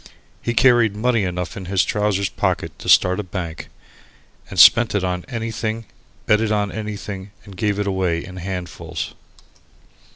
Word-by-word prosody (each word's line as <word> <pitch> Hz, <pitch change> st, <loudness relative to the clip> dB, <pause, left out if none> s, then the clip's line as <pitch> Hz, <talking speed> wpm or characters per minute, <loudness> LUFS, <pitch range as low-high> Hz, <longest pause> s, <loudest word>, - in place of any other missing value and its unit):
He 120 Hz, -, -2 dB
carried 120 Hz, -4 st, +4 dB
money 115 Hz, -1 st, +1 dB
enough 90 Hz, 0 st, -4 dB
in 95 Hz, -, -7 dB
his 95 Hz, 0 st, +1 dB
trousers 105 Hz, -2 st, 0 dB
pockets -, -, -2 dB
to -, -, -5 dB
start 90 Hz, +1 st, +5 dB
a -, -, -2 dB
bank, 85 Hz, -4 st, -6 dB, 0.8 s
and -, -, -8 dB
spent 120 Hz, -3 st, +7 dB
it 100 Hz, -, +1 dB
on 90 Hz, -1 st, -2 dB
anything, 115 Hz, -1 st, -3 dB, 0.4 s
bet 105 Hz, +1 st, +3 dB
it 110 Hz, -1 st, 0 dB
on 105 Hz, -1 st, 0 dB
anything, 105 Hz, -2 st, -6 dB, 0.2 s
and 100 Hz, -2 st, -12 dB
gave 105 Hz, +1 st, 0 dB
it 105 Hz, -, -1 dB
away 95 Hz, -4 st, -1 dB
in 95 Hz, -1 st, -10 dB
handfuls. 90 Hz, -1 st, -5 dB
100 Hz, 160 wpm, -21 LUFS, 90-110 Hz, 0.8 s, spent